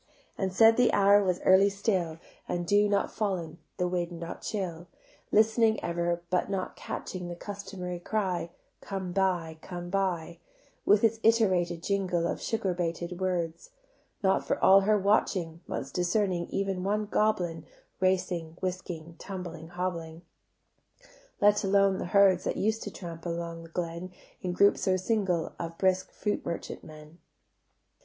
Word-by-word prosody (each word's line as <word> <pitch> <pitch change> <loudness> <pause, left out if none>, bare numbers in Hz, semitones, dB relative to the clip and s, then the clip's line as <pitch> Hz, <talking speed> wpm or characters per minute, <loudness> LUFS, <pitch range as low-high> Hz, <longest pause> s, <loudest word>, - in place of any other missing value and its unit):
And 190 -1 -1
said 225 +4 +6
the 250 - +5
hour 200 0 +6
was 180 -2 0
early 190 +2 +6
still 195 -5 -1 0.3
The - - -1
dew 205 +4 +3
not 200 -1 +1
fall'n, 185 -6 -3 0.2
the 180 - +1
wind 175 -1 -2
not 170 0 -6
chill; 180 -5 -4 0.4
Listening 220 0 +4
ever, 170 0 -1
but 180 +1 +1
not 195 -2 -3
catching 180 -2 -6
The 175 - -5
customary 185 -2 -6
cry, 185 -3 -1 0.3
"Come 190 -2 -4
buy, 175 -4 0
come 175 0 -7
buy," 175 -4 -1 0.5
With 205 +2 +5
its 225 0 +3
iterated 185 -7 +2
jingle 185 -4 0
Of - - -2
sugar 220 -5 -1
baited 175 +1 -3
words: 175 - -2 0.5
Not 190 0 +3
for - - 0
all 195 +1 +7
her 210 +2 +3
watching 185 -4 +1
Once 135 - -4
discerning 180 -1 0
even 195 -2 -2
one 210 +2 0
goblin 175 -7 0 0.3
Racing, 180 -3 0
whisking, 175 -3 -5
tumbling, 175 -4 -7
hobbling; 170 -2 -4 1.2
Let 205 +1 +4
alone 195 -1 +3
the - - -3
herds 190 0 +4
That - - -1
used 220 +2 0
to - - -5
tramp 165 -3 -8
along 170 0 -4
the 165 - -12
glen, 170 +1 -4 0.3
In 180 - -2
groups 200 +2 +3
or 185 0 +4
single, 185 -4 0
Of 165 -1 -5
brisk 185 -1 +1
fruit 210 - -2
merchant 170 - -5
men. 155 +2 -13
185 Hz, 150 wpm, -29 LUFS, 170-200 Hz, 1.2 s, all